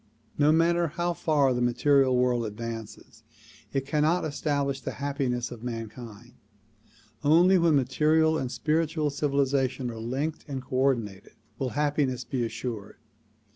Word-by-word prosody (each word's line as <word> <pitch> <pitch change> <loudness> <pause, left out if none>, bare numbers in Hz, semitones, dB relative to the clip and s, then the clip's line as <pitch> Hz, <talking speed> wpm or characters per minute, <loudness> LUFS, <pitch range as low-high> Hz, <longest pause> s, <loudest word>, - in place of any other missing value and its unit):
No 145 +1 +4
matter 170 +1 +3
how 175 +3 -2
far 145 -5 +2
the 125 - -1
material 130 +1 +3
world 125 -1 +2
advances 115 0 -7 0.5
it 135 -1 -1
cannot 155 +4 +1
establish 140 -2 -1
the - - -5
happiness 130 -4 -2
of 120 -2 -9
mankind. 115 0 -7 0.9
Only 175 +5 +5
when 165 -2 +4
material 155 +4 +3
and 130 -5 -2
spiritual 155 -1 0
civilization 140 -3 0
are 115 - -8
linked 135 +7 -3
and 135 -2 -4
coordinated 130 -7 -1 0.3
will 135 -2 -1
happiness 145 -4 0
be 125 -3 -2
assured. 115 -3 -5
135 Hz, 130 wpm, -27 LUFS, 120-150 Hz, 0.9 s, Only